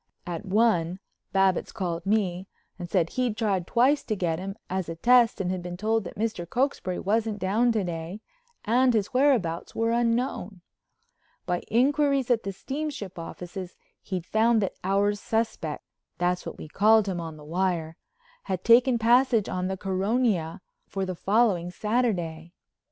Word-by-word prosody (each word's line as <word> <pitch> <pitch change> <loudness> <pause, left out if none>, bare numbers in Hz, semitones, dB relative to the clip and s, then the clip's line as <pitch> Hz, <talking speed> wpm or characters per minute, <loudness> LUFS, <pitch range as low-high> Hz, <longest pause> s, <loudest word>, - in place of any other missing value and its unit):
At 175 +1 -5
one 185 -4 +2 0.3
Babbitts 195 -2 +2
called 175 -3 -4
me 190 -3 0 0.3
and 175 -1 -6
said 175 -4 +1
he'd 245 -4 -1
tried 195 -6 0
twice 265 +5 +3
to 215 - -1
get 170 -4 -1
him 195 +1 -5
as 185 -2 -3
a 165 - -4
test 240 +5 +4
and 185 -1 -2
been 175 0 -6
told 220 +1 0
that - - -8
Mr. 210 -6 -2
Cokesbury 245 -8 -1
wasn't 215 +1 0
down 215 +5 +2
to 215 -3 0
day 175 +3 -5 0.4
and 245 +2 +3
his 210 +4 0
whereabouts 250 - +1
were 230 0 +1
unknown. 230 -5 -1 0.8
By 175 0 0
inquiries 275 +2 +2
at 230 -2 +3
the 195 - -4
steamship 265 - -5
offices 180 +2 -7 0.3
he'd 185 -4 -4
found 225 +3 +3
that 195 - -2
Our 200 +2 +2
Suspect—that's 180 -4 -3
what - - -7
we - - -8
called 215 +6 +4
him 180 -3 -2
on 160 -2 -7
the 150 - -13
wire—had 185 - -4
taken 240 +1 +5
passage 235 -1 +3
on 185 0 -2
the 190 0 -3
Caronia 195 -2 0 0.3
for 195 -1 -3
the 185 - -3
following 195 -2 +1
Saturday. 180 -6 -1
200 Hz, 150 wpm, -26 LUFS, 180-230 Hz, 0.8 s, taken